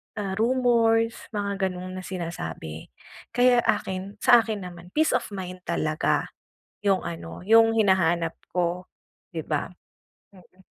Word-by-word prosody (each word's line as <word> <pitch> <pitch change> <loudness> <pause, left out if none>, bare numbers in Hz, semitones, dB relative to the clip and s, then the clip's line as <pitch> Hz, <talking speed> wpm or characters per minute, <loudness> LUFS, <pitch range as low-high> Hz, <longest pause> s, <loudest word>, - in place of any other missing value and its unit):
ah, 200 -3 -3
rumors 230 -2 +3 0.2
mga 200 -2 -1
ganun, 185 0 -7
na 185 - -6
sinasabi. 80 - -6 0.5
Kaya, 245 0 +5
akin, 190 +1 -1
sa 240 - +7
akin 215 -3 -4
naman, 175 0 -12
peace 315 +1 +3
of - - 0
mind 185 -2 -6
talaga 155 0 0 0.6
yung 195 -2 +2
ano 170 -1 -7
yung 225 +1 +7
hinahanap 175 -5 +2 0.2
ko 180 +1 -1 0.5
'di 160 - -2
ba? 150 +2 -1 0.6
Mm. 185 0 -20
190 Hz, 130 wpm, -25 LUFS, 175-225 Hz, 0.6 s, sa